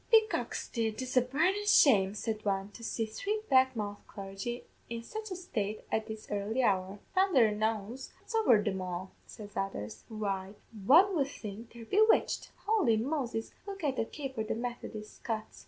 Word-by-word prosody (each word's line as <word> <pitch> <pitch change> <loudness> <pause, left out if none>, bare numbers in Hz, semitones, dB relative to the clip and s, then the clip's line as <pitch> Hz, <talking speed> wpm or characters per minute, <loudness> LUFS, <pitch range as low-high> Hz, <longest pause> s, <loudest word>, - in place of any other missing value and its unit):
"'Be 445 -1 +8
goxty, 230 -2 -2
it's 250 +4 -4
a 255 - +7
burnin' 350 +11 +1
shame,' 210 - +6
said 215 0 -3
one, 195 0 -1
'to 230 - -12
see 225 0 -1
three 395 - -2
black 260 -1 +5
mouth 205 -2 -3
clargy 195 +4 -5 0.3
in 230 0 -4
sich 435 - -6
a 370 - -4
state 215 - -3
at 220 - 0
this 220 -1 -7
early 210 +5 0
hour!' 190 -2 +1 0.2
'Thundher 370 -10 +5
an' 210 0 -4
ounze, 220 +3 -2
what's - - -11
over 435 - +5
them 190 -3 -1
at - - -3
all?' 180 +1 -5 0.2
says 205 -1 -10
others; 110 - -4
'why, 200 -2 -3 0.3
one 370 +8 +7
would 280 -4 +2
think 225 -4 -8
they're 235 -1 -10
bewitched. 435 - +3 0.2
Holy 395 - +3
Moses, 240 -2 -2
look 395 -2 -6
at 280 -3 +1
the 225 - 0
caper 265 -3 -4
the 215 - -2
Methodis 230 -2 -6
cuts! 220 -2 -4
225 Hz, 180 wpm, -31 LUFS, 205-275 Hz, 0.3 s, Be